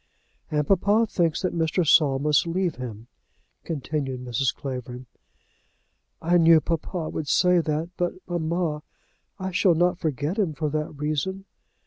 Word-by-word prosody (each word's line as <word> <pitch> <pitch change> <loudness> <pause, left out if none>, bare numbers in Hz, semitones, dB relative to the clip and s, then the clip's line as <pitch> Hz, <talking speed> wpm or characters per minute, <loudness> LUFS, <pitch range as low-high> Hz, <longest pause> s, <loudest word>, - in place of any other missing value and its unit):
"And 150 -1 0
papa 205 +4 +3
thinks 170 -5 0
that 185 - 0
Mr. 165 +1 0
Saul 140 -3 +5
must 150 +3 +2
leave 175 0 -1
him," 115 -3 -7 0.6
continued 140 -4 -3
Mrs. 125 +2 0
Clavering. 125 -2 -6 1.1
"I 175 +2 +2
knew 165 -1 +7
papa 165 +1 -3
would 155 - -4
say 180 +3 +4
that; 160 +1 -2
but, 175 0 0
mamma, 170 -2 -1 0.6
I 190 0 -4
shall 185 -1 +3
not 175 +2 +2
forget 155 - -2
him 180 -7 +1
for 155 0 -2
that 150 0 -2
reason." 155 +6 -2
160 Hz, 140 wpm, -25 LUFS, 145-175 Hz, 1.1 s, knew